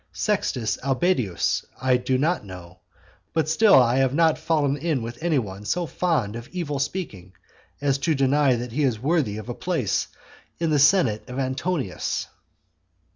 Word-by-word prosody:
Sextus 125 - -1
Albedius 135 - 0 0.2
I 130 -1 +3
do 130 +1 0
not 160 +3 0
know, 90 -2 -11 0.5
but 160 -2 +1
still 200 +7 +5
I 125 -1 +5
have 135 0 +2
not 160 -1 +3
fallen 145 -4 +1
in 145 -4 -1
with 120 +3 -7
any 165 -3 +1
one 100 -4 -4
so 175 +11 -1
fond 155 - -1
of 115 +1 -7
evil 155 -6 -4
speaking, 110 - -4 0.5
as 140 -1 +1
to 160 +2 +1
deny 135 0 +3
that 120 0 -5
he 145 +6 -1
is 125 -6 +1
worthy 135 -6 0
of 110 - -8
a - - -3
place - - -1 0.5
in 165 -2 0
the 150 - +3
senate 140 - +3
of 125 - -6
Antonius. 130 - -2
135 Hz, 165 wpm, -24 LUFS, 120-160 Hz, 0.5 s, still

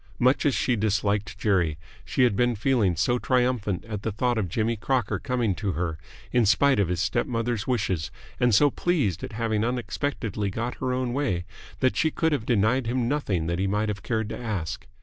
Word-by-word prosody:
Much 130 +4 +3
as 140 - +2
she 125 - +1
disliked 105 -2 0
Jerry, 95 -8 +1 0.3
she 130 - +1
had 120 -5 +3
been 120 +2 +2
feeling 110 -5 +2
so 120 +9 +1
triumphant 125 -7 0
at 105 -3 -5
the 110 - -2
thought 120 +2 0
of 95 -5 -2
Jimmy 115 +6 0
Crocker 120 0 -1
coming 125 -6 0
to 100 0 -2
her 80 -1 -2 0.3
in 120 - +3
spite 115 +4 +4
of 100 - +2
his 90 0 -1
step 95 +9 0
mother's 115 -2 -2
wishes 95 - 0 0.3
and 120 -4 +4
so 145 +5 +5
pleased 135 - 0
at - - -6
having 110 -1 0
unexpectedly 120 -3 -2
got 115 +5 -3
her 130 -1 -2
own 125 -1 -1
way 125 -11 -1 0.4
that 130 - +3
she 160 - +2
could 160 +1 0
have 130 -7 -1
denied 120 +3 +2
him 120 0 0
nothing 110 - 0
that 85 +2 -1
he 95 - +1
might 105 +2 0
have 100 -1 -3
cared 110 -2 -1
to - - -5
ask. 100 -4 -4
115 Hz, 205 wpm, -26 LUFS, 100-125 Hz, 0.4 s, so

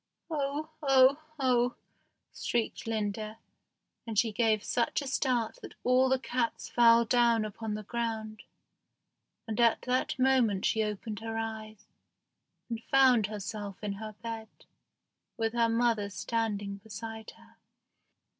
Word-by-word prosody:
"Oh! 295 +1 -2
oh! 270 0 +5 0.2
oh!" 250 -2 +2 0.6
shrieked 235 -1 -2
Linda, 215 0 -2 0.7
and 220 -2 -4
she 225 +1 +3
gave 215 -1 +2
such 240 +4 0
a - - -6
start 250 -4 0
that - - -10
all 255 +1 +4
the 265 - +3
cats 250 -2 -2
fell 235 -1 +5
down 235 -2 +3
upon 215 0 -4
the 215 - -5
ground; 220 -1 -3 1.1
and 220 0 -3
at 235 -1 +4
that 255 +1 0
moment 255 -7 +3
she 220 - +2
opened 210 0 -3
her 225 0 -4
eyes, 220 -1 -5 0.8
and 230 -1 -4
found 255 -6 +5
herself 205 -1 -5
in 205 -1 -2
her 215 -1 -6
bed, 225 -1 -5 0.9
with 225 -1 -1
her 235 -1 +2
mother 230 -3 +1
standing 205 -1 -2
beside 220 +1 -8
her. 230 0 -21
225 Hz, 130 wpm, -30 LUFS, 215-245 Hz, 1.1 s, oh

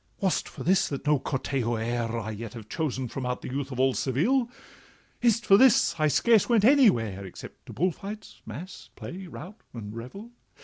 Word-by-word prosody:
'Was 190 -2 +1
it - - -13
for - - -8
this 190 +1 +3
that 140 0 -5
no 150 -1 +3
Cortejo 130 -3 -2
e'er 115 0 -2
I 110 -1 -4
yet 110 +1 -7
have 110 -3 -9
chosen 130 -3 -2
from 130 +3 -6
out 125 0 -3
the - - -5
youth 140 +1 -3
of 130 +1 +1
Seville? 230 - +1 0.7
Is 235 -2 +4
it 235 - -11
for 195 - +7
this 260 0 +5
I 155 - +3
scarce 225 - +3
went 225 -4 +4
anywhere, 120 - +4
Except 95 - -11
to - - -8
bull 180 +6 +1
fights, 210 +5 -9
mass, 150 - -9
play, 185 +1 -8
rout, 190 +4 -10
and 105 -2 -7
revel? 195 - -9
140 Hz, 195 wpm, -27 LUFS, 120-200 Hz, 0.7 s, for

